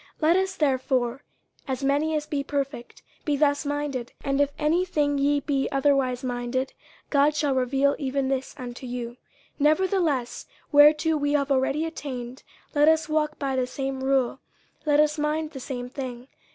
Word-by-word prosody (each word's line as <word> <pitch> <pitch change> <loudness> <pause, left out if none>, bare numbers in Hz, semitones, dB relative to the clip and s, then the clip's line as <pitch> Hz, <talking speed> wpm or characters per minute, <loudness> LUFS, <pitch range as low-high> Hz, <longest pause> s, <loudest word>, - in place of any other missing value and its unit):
50:003:015 - - -31
Let 320 +2 +4
us 380 0 0
therefore, 260 -3 0 0.4
as 265 0 -3
many 290 +3 +1
as 300 -1 -1
be 295 -2 -2
perfect, 275 -3 -4 0.2
be 295 -2 0
thus 285 0 +2
minded: 290 -4 -3
and 275 0 +1
if 285 - +3
in 300 - -3
any 335 +4 +3
thing 290 -5 0
ye 285 +1 +2
be 275 -2 0
otherwise 270 -2 +1
minded, 245 +1 -2 0.4
God 290 +1 +4
shall 290 -2 +1
reveal 270 +2 +2
even 275 -1 -1
this 265 0 -2
unto 250 0 -7
you. 245 -1 -4
50:003:016 240 - -17 0.4
Nevertheless, 310 -4 +1 0.3
whereto 300 +2 +6
we 290 0 0
have 280 -1 +1
already 275 +4 +1
attained, 260 -5 -6 0.3
let 295 0 +4
us 320 -1 +4
walk 305 -1 0
by 275 -2 -2
the 255 -1 0
same 270 0 -4
rule, 265 -1 +1 0.5
let 295 0 +4
us 300 0 +3
mind 305 +1 -1
the 275 - -8
same 245 -1 -5
thing. 250 -2 -7
280 Hz, 175 wpm, -25 LUFS, 260-300 Hz, 0.5 s, whereto